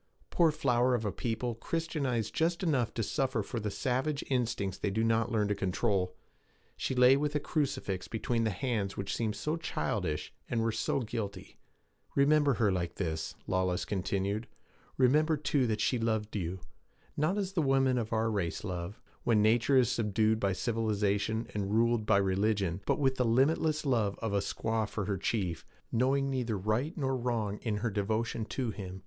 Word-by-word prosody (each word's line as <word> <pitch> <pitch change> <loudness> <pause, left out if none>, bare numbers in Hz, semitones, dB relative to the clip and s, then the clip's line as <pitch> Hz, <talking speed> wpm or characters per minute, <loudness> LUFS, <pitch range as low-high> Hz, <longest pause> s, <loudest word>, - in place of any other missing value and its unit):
Poor 170 -2 +4
flower 130 -5 +2
of 115 -2 -2
a 105 - 0
people 120 +2 -2
Christianized 135 -4 -2
just 170 +2 0
enough 135 -9 +1
to 115 - 0
suffer 135 +4 0
for 120 - -4
the 105 -1 -2
savage 135 +7 -1
instincts 115 -7 -1
they - - 0
do 110 +3 0
not 115 +1 +2
learn 105 -3 +2
to 105 - +1
control! 95 -1 0 0.6
She 130 - -2
lay 125 +1 +7
with 150 +1 -1
a - - +3
crucifix 135 - -2
between 115 +1 -1
the 110 - +2
hands 105 -2 -2
which 100 0 -2
seemed 110 -2 -1
so 155 +2 -2
childish, 90 - -2 0.2
and 120 - 0
were 115 - +1
so 135 - 0
guilty. 105 -5 -5 0.6
'Remember 145 -1 +4
her 110 -4 +2
like 85 -2 -2
this,' 80 -4 -3
Lawless 90 -1 0
continued. 100 +3 -1 0.5
Remember, 150 +5 +4
too, 145 -3 +1
that 110 -1 -1
she 125 - +1
loved 110 -1 -1
you; 90 -1 -3 0.5
not 155 +7 +1
as 195 -2 -2
the 175 - +1
women 135 -3 +3
of 110 -2 -4
our 110 0 +1
race 95 -5 -2
love, 90 0 -5 0.2
when 110 -3 +3
nature 120 +5 +4
is 125 -3 +4
subdued 110 0 +1
by 100 -2 +1
civilization 110 0 0
and 100 -2 -2
ruled 115 -1 +2
by 105 - +5
religion, 100 -1 +1
but - - +2
with 135 -2 +1
the 125 - +2
limitless 150 +6 +2
love 115 -7 +1
of 110 -3 -3
a 100 - +3
squaw 110 +1 -1
for 105 - -3
her 100 -1 -2
chief, 95 -5 -1 0.3
knowing 135 +3 +2
neither 125 -5 -1
right 110 - -1
nor 135 -3 0
wrong 115 -5 -1
in 110 -3 -2
her 115 - +1
devotion 110 +3 -1
to 125 0 -2
him. 95 -2 -7
115 Hz, 180 wpm, -31 LUFS, 100-130 Hz, 0.6 s, lay